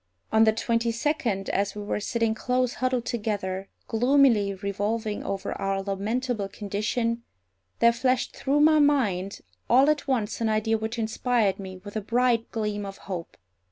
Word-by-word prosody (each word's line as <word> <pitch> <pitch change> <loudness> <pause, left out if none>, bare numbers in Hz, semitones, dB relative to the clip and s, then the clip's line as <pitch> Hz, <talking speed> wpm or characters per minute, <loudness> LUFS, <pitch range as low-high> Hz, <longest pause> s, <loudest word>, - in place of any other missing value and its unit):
On 220 0 +5
the 220 - +5
twenty 230 +1 0
second, 230 -6 -1
as 200 0 0
we 210 - -5
were 205 - -2
sitting 225 +1 0
close 250 +2 0
huddled 255 -2 +1
together, 200 -5 -3 0.2
gloomily 230 -4 +3
revolving 205 +2 -2
over 195 -1 -3
our 195 0 -1
lamentable 210 +3 -2
condition, 215 +4 -2 0.6
there 235 0 +6
flashed 255 +1 0
through 285 +2 +1
my 310 0 +6
mind 210 -10 +1 0.3
all 265 +5 +6
at 295 -1 -3
once 235 -5 -1
an 225 - +2
idea 220 +1 +1
which 220 +2 -3
inspired 225 -2 +1
me 190 -1 -7
with 205 0 -9
a 215 - -1
bright 235 +1 +1
gleam 210 -2 -2
of 195 -1 -7
hope. 180 -4 -6
220 Hz, 160 wpm, -26 LUFS, 200-245 Hz, 0.6 s, there